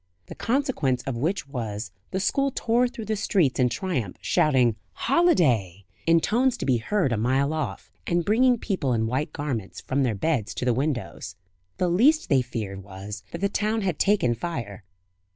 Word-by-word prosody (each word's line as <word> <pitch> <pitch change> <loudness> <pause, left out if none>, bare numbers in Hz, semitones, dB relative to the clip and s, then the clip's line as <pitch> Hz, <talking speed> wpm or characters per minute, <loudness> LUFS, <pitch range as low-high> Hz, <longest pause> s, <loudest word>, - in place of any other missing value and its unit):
The - - -9
consequence 235 - 0
of 135 - -3
which 160 +7 -1
was, 110 -6 -5 0.2
the 190 - -2
school 275 +7 +1
tore 240 +2 +2
through 235 -3 -7
the 215 +1 -1
streets 180 -10 +1
in 125 -1 +4
triumph, 125 - -3
shouting 125 -7 +3 0.2
"Holiday!" 130 - +2 0.2
in 165 0 +6
tones 245 +7 +1
to - - -4
be 130 -3 +3
heard 155 - 0
a 115 - +1
mile 135 +6 +1
off, 135 - -4 0.2
and 170 -1 +1
bringing 245 +4 +4
people 185 - -1
in 110 -1 +1
white 130 +6 -1
garments, 125 -9 -4
from 135 +2 -1
their 120 -5 +1
beds 125 -1 -1
to - - -3
the 125 - +3
windows. 125 - -3 0.4
The 180 - +1
least 255 - +3
they 135 -3 +4
feared 105 -6 -5
was, 100 +1 -8
that - - -6
the 200 - +3
town 215 +2 0
had 185 -5 -1
taken 195 - +3
fire. 115 -6 -5
140 Hz, 180 wpm, -25 LUFS, -, 0.4 s, in